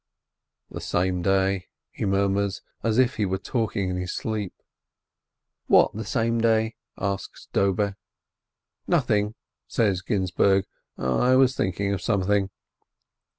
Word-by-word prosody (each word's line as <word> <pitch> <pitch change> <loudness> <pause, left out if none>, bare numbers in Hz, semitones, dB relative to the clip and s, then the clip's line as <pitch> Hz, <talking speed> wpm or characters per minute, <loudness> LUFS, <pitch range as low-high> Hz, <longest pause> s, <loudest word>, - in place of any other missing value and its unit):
"The - - -6
same 90 0 0
day," 95 0 +1 0.2
he - - -4
murmurs, 100 0 0 0.2
as 115 -1 0
if 130 -1 +3
he 105 - +1
were 95 +1 -1
talk 110 +3 -2
ing 95 -2 0
in 90 - -2
his 90 -1 -3
sleep. 105 -4 -3 1.2
"What - - +5
the 110 - -4
same 115 +1 0
day 110 0 +2
?" - - -64
asks 100 0 -4
Dobe. 100 +1 +1 0.9
"Nothing," 105 0 +1 0.3
says 100 -5 +1
Ginzburg. 95 -1 +2 0.3
"I 65 - +2
was 130 -1 +4
thinking 100 +2 -1
of 100 - -3
something." 100 -1 +1
100 Hz, 130 wpm, -25 LUFS, 95-110 Hz, 1.2 s, What